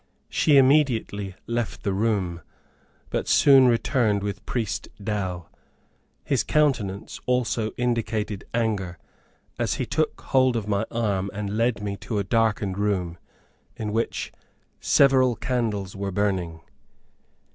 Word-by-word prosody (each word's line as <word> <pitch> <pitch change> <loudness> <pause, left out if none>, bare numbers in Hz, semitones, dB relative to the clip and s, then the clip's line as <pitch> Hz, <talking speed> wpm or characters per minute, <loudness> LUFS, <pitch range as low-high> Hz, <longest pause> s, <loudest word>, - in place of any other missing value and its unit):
She 150 -3 +4
immediately 125 -8 +2
left 120 -1 -3
the 100 - 0
room, 95 -5 0 0.7
but - - -2
soon 135 -2 +6
returned 115 -3 +2
with 100 -1 -4
Priest 115 -5 -2
Dow. 95 -4 -3 0.8
His - - +1
countenance 120 -10 0
also 120 -3 +1
indicated 110 -4 -1
anger, 105 -7 -1 0.6
as - - 0
he - - -2
took - - -1
hold 130 -2 +2
of 110 -3 -2
my 105 +1 0
arm 100 -5 -1
and 105 0 -3
led 115 -2 0
me 100 -1 -3
to 110 - -4
a 100 - +1
darkened 105 -2 0
room, 90 -5 -1 0.6
in 105 -1 -4
which 115 +1 -2 0.5
several 130 -3 +4
candles 110 -8 -2
were 100 0 -3
burning. 90 -5 -1
105 Hz, 125 wpm, -25 LUFS, 100-120 Hz, 0.8 s, soon